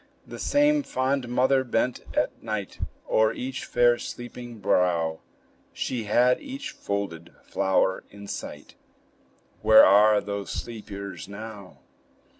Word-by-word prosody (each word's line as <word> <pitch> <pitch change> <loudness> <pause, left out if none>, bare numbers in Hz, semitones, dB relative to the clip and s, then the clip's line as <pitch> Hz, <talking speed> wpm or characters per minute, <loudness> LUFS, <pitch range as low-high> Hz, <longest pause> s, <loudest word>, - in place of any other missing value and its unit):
The - - -9
same 295 +1 +3
fond 130 - -1
mother 130 +2 +3
bent 125 0 0 0.2
at - - 0
night 110 -3 -5 0.3
O'er 110 0 +3
each 130 +1 -5
fair, 120 0 +3
sleeping 120 -1 -8
brow; 85 -5 +1 0.5
She 120 -4 -3
had 125 +4 +3
each 275 0 -6
folded 90 -5 -5
flower 95 0 +1
in 100 0 -11
sight: - - -7 0.9
Where 110 - +8
are 105 +2 +6
those 100 -1 -5
sleepers 100 -7 -6
now? 100 -1 -10
110 Hz, 115 wpm, -26 LUFS, 100-125 Hz, 0.9 s, Where